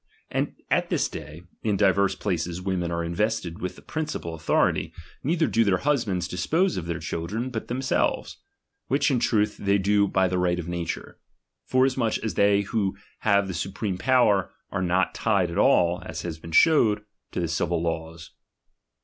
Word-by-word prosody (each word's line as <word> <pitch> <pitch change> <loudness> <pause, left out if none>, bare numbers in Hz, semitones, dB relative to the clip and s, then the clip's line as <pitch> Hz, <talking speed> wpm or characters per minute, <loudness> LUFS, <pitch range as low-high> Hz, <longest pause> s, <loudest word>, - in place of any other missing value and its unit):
And - - -1 0.2
at - - +2
this - - +1
day, 75 +4 -9 0.2
in 105 -3 0
divers 100 -1 +3
places 85 -1 -2
women 90 -2 -2
are 85 0 -1
invested 85 0 -2
with 90 0 -3
the - - -15
princi 155 -1 -3
pal 85 - -6
authority; 80 0 +1 0.3
neither 160 +3 +2
do 115 - +2
their 100 -4 +2
husbands 110 -11 0
dispose 160 - +1
of 85 - -4
their 85 -2 -2
children, 105 +10 -4
but 110 -3 -4
themselves; 130 +2 -1 0.5
which 140 +3 +2
in 125 - +2
truth 105 -3 +1
they 100 0 +2
do 100 +1 +3
by 95 -1 +2
the 90 0 -1
right 90 -1 +1
of 85 -2 -5
nature; 85 -1 -4 0.5
forasmuch 130 -3 +2
as 110 - -2
they 100 0 +4
who 100 -1 -1 0.2
have 100 -2 +3
the 95 - -4
supreme 95 +2 -3
power, 115 -7 +3 0.2
are 95 - -2
not 90 +1 +1
tied 100 -6 +1
at 90 - -2
all 90 -9 +4
(as - - -6
hath 80 -2 -5
been 80 - -9
shewed) 110 - +4 0.3
to - - -3
the 85 - 0
civil 85 +1 0
laws. 80 0 -4
95 Hz, 175 wpm, -25 LUFS, 85-110 Hz, 0.5 s, they